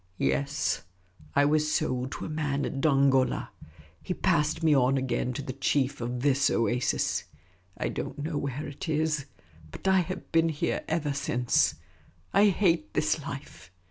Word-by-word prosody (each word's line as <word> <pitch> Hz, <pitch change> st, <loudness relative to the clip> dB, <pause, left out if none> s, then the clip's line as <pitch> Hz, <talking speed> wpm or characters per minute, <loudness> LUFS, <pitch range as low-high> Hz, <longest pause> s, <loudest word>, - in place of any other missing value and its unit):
"Yes; 70 Hz, +1 st, 0 dB, 0.5 s
I 145 Hz, -, +5 dB
was 150 Hz, +1 st, +2 dB
sold 130 Hz, -4 st, -1 dB
to -, -, -5 dB
a -, -, -4 dB
man 150 Hz, -3 st, -1 dB
at 135 Hz, -, -3 dB
Dongola. 135 Hz, -3 st, +3 dB, 0.5 s
He 180 Hz, -, -3 dB
passed 160 Hz, -2 st, +1 dB
me 155 Hz, -2 st, +5 dB
on 135 Hz, 0 st, +3 dB
again 130 Hz, -1 st, -1 dB
to 140 Hz, -, -5 dB
the 130 Hz, -, -5 dB
chief 135 Hz, 0 st, 0 dB
of 120 Hz, +1 st, -3 dB
this 140 Hz, 0 st, +3 dB
oasis. 120 Hz, +2 st, 0 dB, 0.5 s
I -, -, -1 dB
don't 135 Hz, +1 st, -5 dB
know 150 Hz, +2 st, -3 dB
where 140 Hz, +2 st, -3 dB
it 145 Hz, +3 st, -6 dB
is; 155 Hz, -2 st, 0 dB, 0.5 s
but -, -, -6 dB
I 190 Hz, 0 st, +5 dB
have 185 Hz, +1 st, -4 dB
been 165 Hz, 0 st, +3 dB
here 150 Hz, -2 st, -1 dB
ever 155 Hz, -3 st, 0 dB
since. 125 Hz, -3 st, +1 dB, 0.6 s
I 200 Hz, +2 st, +6 dB
hate 170 Hz, -5 st, +1 dB
this 155 Hz, 0 st, +1 dB
life. 140 Hz, -8 st, -8 dB
145 Hz, 160 wpm, -28 LUFS, 130-160 Hz, 0.6 s, I